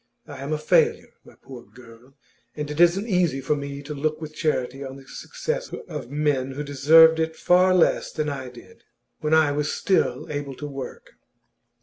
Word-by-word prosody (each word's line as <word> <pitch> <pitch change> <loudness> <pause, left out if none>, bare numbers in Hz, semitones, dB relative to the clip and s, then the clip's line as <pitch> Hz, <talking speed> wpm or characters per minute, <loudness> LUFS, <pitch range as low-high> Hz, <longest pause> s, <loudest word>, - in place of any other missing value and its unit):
I - - -10
am 140 +2 -5
a 155 - 0
failure, 155 - +1
my - - -18
poor 130 -3 -11
girl, 120 +3 -17 0.4
and 150 -1 -5
it 150 - -6
isn't 175 +5 +4
easy 180 - +1
for 135 +3 0
me 140 0 -6
to 150 +1 -6
look 155 +2 -2
with 155 -1 -8
charity 140 -4 -2
on 135 -1 -7
the 135 -1 -14
success - - -5 0.2
of 150 -8 -7
men 140 -2 -1
who 145 +2 -5
deserved 160 +3 +6
it 160 0 -1
far 185 +1 +3
less 175 - +2
than 155 -1 -3
I 135 -3 -5
did, 120 -1 -16 0.4
when 155 +1 +1
I 155 -2 +4
was 145 0 -1
still 190 - 0
able 145 -2 -5
to 150 - -7
work. 140 -2 -8
150 Hz, 190 wpm, -24 LUFS, 135-160 Hz, 0.4 s, deserved